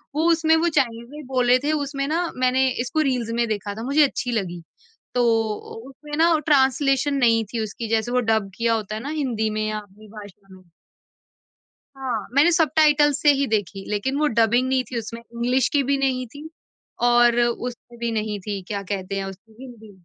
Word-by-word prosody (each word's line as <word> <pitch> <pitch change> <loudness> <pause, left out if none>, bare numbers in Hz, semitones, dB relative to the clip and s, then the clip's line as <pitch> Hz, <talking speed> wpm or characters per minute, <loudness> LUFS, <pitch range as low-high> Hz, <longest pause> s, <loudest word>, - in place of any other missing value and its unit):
वो 315 +2 +1
उसमें 320 -1 +3
वो 335 +2 +2
चाइनीज़ 235 -6 -1
में 300 0 -9
बोल 255 -2 0
रहे 250 +1 +5
थे, 290 +3 -1
उसमें 280 -2 -2
ना, 335 +2 -1
मैंने 255 +1 +2
इसको 255 +6 -1
रील्स 255 -6 -1
में 235 0 +1
देखा 205 -2 -3
था, 225 - -6
मुझे 280 +4 +3
अच्छी 265 -2 -1
लगी। 180 -7 -3 0.5
तो 245 - +3
उ 225 +1 -2
उसमें 295 +2 -8
ना, 330 0 +4
ट्रांसलेशन 275 -1 +2
नहीं 230 -4 +3
थी 235 - -1
उसकी, 220 +2 -6
जैसे 225 +1 0
वो 250 - +2
डब 215 -3 0
किया 230 0 +1
होता 215 -1 -3
है 215 - -5
ना, 275 - -6
हिंदी 250 -8 -1
में 215 0 -2
या 215 0 -2
अपनी 210 +1 -16
भाषा 205 -2 -13
में। 185 - -18 1.3
हाँ, 250 -6 -3
मैंने 295 +5 +5
सबटाइटल्स 300 -3 +3
से 295 - +6
ही 280 0 0
देखी, 205 -4 -2
लेकिन 215 +7 -1
वो 305 - +2
डबिंग 235 0 +2
नहीं 260 -1 +1
थी 245 - -3
उसमें। 230 +1 -6
इंग्लिश 235 +2 0
की 285 - +1
भी 280 - +3
नहीं 260 -2 0
थी, 290 +6 -11 0.5
और 240 0 +4
उसमें 240 0 -3
भी 235 0 -1
नहीं 215 -2 -2
थी, 200 +1 -4
क्या 200 -1 -3
कहते 195 0 -4
हैं 195 - -2
उसको, 195 +4 -10
हिंदी। 235 -5 -12
240 Hz, 200 wpm, -23 LUFS, 220-275 Hz, 1.3 s, से